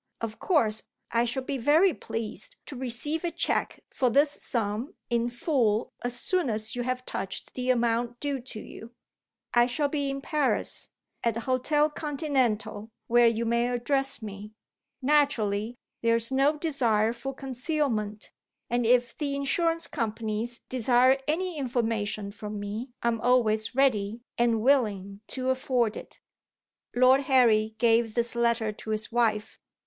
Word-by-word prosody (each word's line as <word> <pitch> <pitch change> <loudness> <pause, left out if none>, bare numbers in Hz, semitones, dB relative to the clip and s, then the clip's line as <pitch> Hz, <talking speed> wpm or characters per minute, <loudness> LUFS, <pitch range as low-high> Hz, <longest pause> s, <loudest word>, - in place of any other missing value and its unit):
Of 225 -1 -5
course, 225 - +2 0.3
I 235 +1 +2
shall 255 +3 -2
be 275 0 -3
very 315 +9 +4
pleased 225 - -5
to 285 - -8
receive 265 +6 -1
a 345 - 0
cheque 335 0 -1
for 255 -3 +1
this 285 +5 +4
sum 225 -1 -3 0.2
in 235 0 +1
full 240 -4 0
as 245 0 -3
soon 360 -4 0
as 220 +2 -1
you 245 - -2
have 255 +1 -2
touched - - -4
the 255 0 -3
amount 240 0 +1
due 285 -2 -2
to 240 -3 -6
you. 230 +2 -11 0.6
I 240 0 +5
shall 285 +3 0
be 285 -1 -1
in 275 0 -3
Paris, 295 0 -1 0.3
at 230 -2 +1
the 230 - -3
Hotel 270 +5 +2
Continental, 270 -8 -1 0.2
where 240 0 +5
you 230 0 +1
may 235 +1 +1
address 270 +1 0
me. 205 0 -8 0.5
Naturally, 240 -6 +2 0.2
there 230 0 +3
is 230 +2 0
no 275 +3 +3
desire 235 -8 +1
for 265 +3 -6
concealment, 255 -6 -2 0.4
and 240 -1 +1
if 245 0 +3
the 285 -2 -2
Insurance 330 +4 +1
Companies 225 -1 -3
desire 255 +2 +3
any 335 +1 -1
information 225 -5 -1
from 210 0 -6
me 210 +5 -5
I 235 - +3
am 230 -2 -2
always 225 -2 +2
ready 230 -4 +1
and 235 -2 +2
willing 205 -7 +1
to 260 0 -1
afford 250 -4 0
it." - - -10 0.8
Lord 255 +2 +6
Harry 220 -4 +4
gave 230 -1 +3
this 235 -1 0
letter 235 -2 +1
to 215 - -10
his 215 +1 -2
wife. 225 -3 0
240 Hz, 150 wpm, -27 LUFS, 225-275 Hz, 0.8 s, Lord